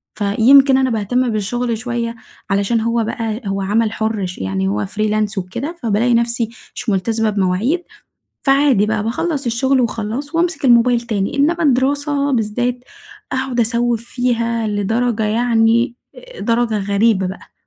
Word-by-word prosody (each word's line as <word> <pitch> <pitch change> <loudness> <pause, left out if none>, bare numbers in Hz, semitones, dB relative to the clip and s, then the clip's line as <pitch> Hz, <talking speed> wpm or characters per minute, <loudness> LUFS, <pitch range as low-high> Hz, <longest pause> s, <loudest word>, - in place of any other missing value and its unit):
فيمكن 250 +7 +5
أنا 265 -1 +2
باهتم 245 +3 0
بالشغل 230 +3 -2
شوية، 235 0 -3 0.3
علشان 200 +3 +1
هو 230 0 0
بقى 225 0 -3
هو 195 0 -2
عمل 215 +3 +1
حُر، 220 -3 -2
ش 180 0 -7
يعني 95 0 -2
هو 105 +1 -1
freelance 215 - -1
وكده، 235 - -4
فبالاقي 230 +2 +2
نفسي 235 -1 +1 0.3
مش - - -4
ملتزمة 220 +3 0
بمواعيد، 205 - 0 0.6
فعادي 270 -6 +3
بقى، 215 -1 -1
باخّلص 280 +5 -2
الشغل، 260 +3 +1
وخلاص، 235 +6 -3
وأمسك 335 -2 0
الموبايل 240 -1 +5
تاني، 215 +1 -2
إنما 330 +5 +2
الدراسة 285 +1 +1
بالذات، 245 +2 -1 0.5
أقعد 260 -2 -1
أسوِّف 235 0 0
فيها، 235 -2 -1
لدرجة، 220 +3 0
يعني 230 +1 +2 0.2
آآ - - -12
درجة 230 -2 +1
غريبة 200 0 +1
بقى. 185 +2 -9
230 Hz, 140 wpm, -18 LUFS, 210-250 Hz, 0.6 s, فيمكن